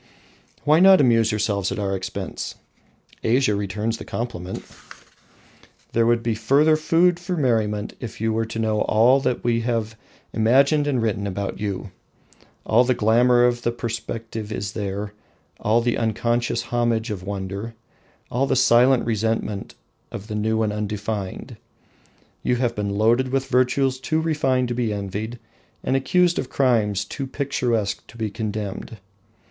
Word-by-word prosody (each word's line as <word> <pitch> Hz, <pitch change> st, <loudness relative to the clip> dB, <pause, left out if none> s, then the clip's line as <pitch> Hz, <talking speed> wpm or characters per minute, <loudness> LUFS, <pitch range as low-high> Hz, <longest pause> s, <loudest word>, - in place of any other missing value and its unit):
Why 155 Hz, +2 st, +4 dB
not 190 Hz, +1 st, +7 dB
amuse 115 Hz, -4 st, +4 dB
yourselves 100 Hz, -2 st, 0 dB
at -, -, -3 dB
our 100 Hz, -2 st, -1 dB
expense? 95 Hz, -1 st, -5 dB, 0.7 s
Asia 120 Hz, 0 st, +3 dB
returns 105 Hz, +3 st, -2 dB
the -, -, -6 dB
compliment. 95 Hz, -6 st, -5 dB, 1.3 s
There 115 Hz, 0 st, +3 dB
would 120 Hz, 0 st, +2 dB
be 115 Hz, -, 0 dB
further 140 Hz, +8 st, +3 dB
food 170 Hz, +3 st, +3 dB
for 180 Hz, 0 st, -3 dB
merriment 110 Hz, -7 st, 0 dB
if 120 Hz, -, -7 dB
you 110 Hz, 0 st, 0 dB
were 115 Hz, 0 st, -1 dB
to 110 Hz, -, -6 dB
know 110 Hz, -1 st, 0 dB
all 120 Hz, +5 st, +4 dB
that 125 Hz, -3 st, -1 dB
we 115 Hz, -1 st, +1 dB
have 115 Hz, -2 st, -2 dB, 0.4 s
imagined 140 Hz, +6 st, +3 dB
and 130 Hz, -5 st, +1 dB
written 100 Hz, -2 st, -1 dB
about 100 Hz, +1 st, -4 dB
you. 100 Hz, -1 st, -4 dB, 0.7 s
All 120 Hz, +3 st, +4 dB
the 125 Hz, 0 st, +1 dB
glamour 120 Hz, +3 st, +4 dB
of 120 Hz, 0 st, +1 dB
the 120 Hz, -, 0 dB
perspective 115 Hz, -2 st, -5 dB
is 100 Hz, -2 st, -3 dB
there, 100 Hz, 0 st, -4 dB, 0.5 s
all 115 Hz, +3 st, +2 dB
the 120 Hz, 0 st, 0 dB
unconscious 120 Hz, +1 st, 0 dB
homage 120 Hz, -1 st, 0 dB
of 100 Hz, -3 st, -4 dB
wonder, 100 Hz, +3 st, -5 dB, 0.6 s
all 130 Hz, +3 st, +1 dB
the -, -, +1 dB
silent 125 Hz, +1 st, +4 dB
resentment 110 Hz, -2 st, -2 dB, 0.4 s
of 100 Hz, -, -7 dB
the 110 Hz, -, -6 dB
new 110 Hz, +1 st, +1 dB
and 105 Hz, -1 st, -1 dB
undefined. 105 Hz, -1 st, -4 dB, 0.8 s
You 125 Hz, -, +1 dB
have 120 Hz, -1 st, 0 dB
been 105 Hz, -1 st, -2 dB
loaded 120 Hz, +5 st, +3 dB
with 135 Hz, +1 st, -1 dB
virtues 130 Hz, +1 st, +1 dB
too 155 Hz, +4 st, 0 dB
refined 135 Hz, -6 st, +1 dB
to -, -, -1 dB
be 120 Hz, -2 st, -1 dB
envied, 105 Hz, +3 st, -4 dB, 0.5 s
and 130 Hz, -, 0 dB
accused 175 Hz, +6 st, +2 dB
of 130 Hz, -, -4 dB
crimes 105 Hz, -7 st, +1 dB
too 135 Hz, +5 st, -5 dB
picturesque 125 Hz, -6 st, -1 dB
to 115 Hz, -, -14 dB
be 110 Hz, -2 st, -2 dB
condemned. 105 Hz, 0 st, -5 dB
115 Hz, 155 wpm, -23 LUFS, 105-125 Hz, 1.3 s, not